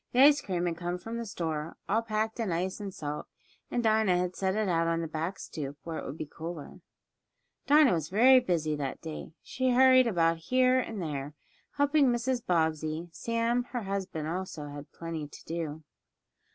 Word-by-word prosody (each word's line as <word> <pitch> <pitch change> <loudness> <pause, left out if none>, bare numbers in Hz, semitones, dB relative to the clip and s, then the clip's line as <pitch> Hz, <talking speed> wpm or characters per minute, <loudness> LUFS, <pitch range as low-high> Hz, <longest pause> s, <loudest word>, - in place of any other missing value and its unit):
The 250 - +5
ice 290 0 +7
cream 180 -3 -2
had 170 -1 -1
come 175 +1 -3
from 225 +6 -6
the 230 - -5
store, 160 -4 -3
all 220 +3 +2
packed 220 0 -2
in 220 -5 -1
ice 185 +4 -1
and 200 -2 -5
salt, 150 -6 -5 0.4
and 240 - -1
Dinah 215 -4 +3
had 180 0 -1
set 190 0 0
it 215 -1 +1
out 165 -2 +2
on 165 0 +1
the 165 - -3
back 160 +4 -3
stoop, 145 -3 -6
where 165 -1 -4
it - - -7
would 145 - -6
be 155 - -4
cooler. 160 +1 -8 0.9
Dinah 295 -4 +6
was 160 -2 -2
very 255 +6 +7
busy 165 -10 0
that 140 -2 -3
day. 160 0 -7
She 260 0 -1
hurried 255 0 +6
about 165 -5 +2
here 255 0 +4
and 225 -4 -4
there, 145 -1 -4 0.4
helping 285 0 +3
Mrs. 240 0 0
Bobbsey. 160 -2 0
Sam, 230 +5 0
her 245 -2 -4
husband, 190 -6 -3
also 165 -3 -4
had 145 +1 -9
plenty 165 -3 -5
to - - -14
do. 160 -2 -4
180 Hz, 190 wpm, -29 LUFS, 160-230 Hz, 0.9 s, ice